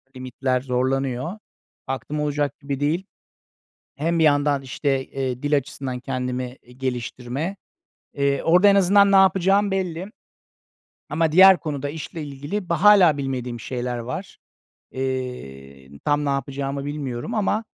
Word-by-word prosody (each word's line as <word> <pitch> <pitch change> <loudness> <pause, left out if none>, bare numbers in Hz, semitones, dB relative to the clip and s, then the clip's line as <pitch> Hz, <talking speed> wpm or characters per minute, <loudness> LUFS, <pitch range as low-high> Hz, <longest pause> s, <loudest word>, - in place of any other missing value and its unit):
limitler 130 0 -2
zorlanıyor. 130 - -1 0.5
Baktım 135 +3 -4
olacak 145 -1 -1
gibi 140 -1 -4
değil. 160 +6 0 0.9
Hem 165 +4 0
bir - - +4
yandan 145 -2 +3
işte, 135 0 -1
eee, 130 -1 -4
dil 145 0 +3
açısından 130 -2 -4
kendimi, 125 -1 -4
eee, 125 - -18
geliştirme. 130 +5 -4 0.6
Eee, 140 -1 0
orada 180 +5 +5
en 200 - +6
azından 200 +1 +5
ne - - +6
yapacağım 195 +2 +4
belli. 185 0 -3 1.0
Ama 160 0 +1
diğer 190 +2 +8
konuda 145 -3 -3
işle 160 +1 -7
ilgili 145 +7 -5
ba 170 0 -1
hâlâ 195 -7 +7
bilmediğim 125 -3 -4
şeyler 125 0 -3
var. 125 +11 -6 0.5
Eee, 70 - -5 0.2
tam 145 0 +1
ne - - 0
yapacağımı 140 0 -3
bilmiyorum 145 - -4
ama 215 +1 0
140 Hz, 130 wpm, -23 LUFS, 130-165 Hz, 1.0 s, diğer